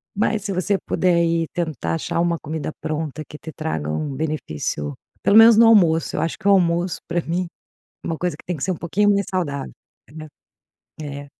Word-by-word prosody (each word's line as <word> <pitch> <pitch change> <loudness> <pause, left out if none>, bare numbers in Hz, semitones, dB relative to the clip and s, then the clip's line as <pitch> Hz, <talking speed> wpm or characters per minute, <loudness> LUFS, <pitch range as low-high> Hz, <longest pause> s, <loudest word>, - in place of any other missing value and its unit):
mas 210 0 0
se 200 - -3
você 195 +2 0
puder 180 -2 +2
ir 165 -1 +1
tentar 155 - -2
achar 80 - -2
uma 170 0 +1
comida 155 0 -4
pronta 155 -1 -3
que 150 - -10
te 160 - -9
traga 80 - -3
um 140 - -2
benefício, 105 - -3 0.3
pelo 205 - +5
menos 225 0 +9
no 230 - +7
almoço, 170 -8 +4
eu - - 0
acho 165 - -2
que 195 - -4
o - - +6
almoço 175 -2 +2
pra 170 0 0
mim, 175 +2 -2 0.6
uma 165 - -3
coisa 180 +2 -2
que - - -17
tem 180 - -2
que 140 - -3
ser - - -1
um - - -5
pouquinho 205 +5 +1
mais 200 -1 +1
saudável, 145 - -3 0.4
né. 155 0 -9 0.7
É. 145 -1 -7
165 Hz, 200 wpm, -21 LUFS, 150-185 Hz, 0.7 s, menos